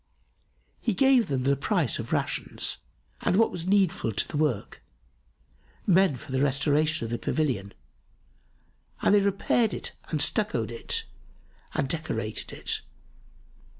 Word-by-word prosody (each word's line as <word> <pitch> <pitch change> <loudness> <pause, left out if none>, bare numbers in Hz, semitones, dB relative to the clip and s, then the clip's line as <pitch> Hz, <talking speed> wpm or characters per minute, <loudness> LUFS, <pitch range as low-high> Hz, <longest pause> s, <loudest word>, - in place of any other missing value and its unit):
He 225 -5 -1
gave 265 -2 +5
them 135 -3 -1
the 140 +1 +3
price 155 - 0
of - - -5
rations[FN#279] - - -1 0.4
and - - +2
what 225 +3 +4
was 175 0 -5
needful 190 - +2
to 100 - 0
the - - -7
work 145 -9 -1 1.0
men 190 -4 +4
for 130 +3 -10
the 130 - +1
restoration 145 0 +2
of 115 - -5
the 120 - -2
pavilion, 120 -11 -1 1.3
and - - +5
they 205 - +6
repaired 200 +3 +2
it - - -4 0.2
and 155 - -1
stucco'd 125 - +1
it 115 - -2 0.7
and 135 - +1
decorated 125 -8 -3
it. - - -3
155 Hz, 135 wpm, -27 LUFS, 130-195 Hz, 1.3 s, they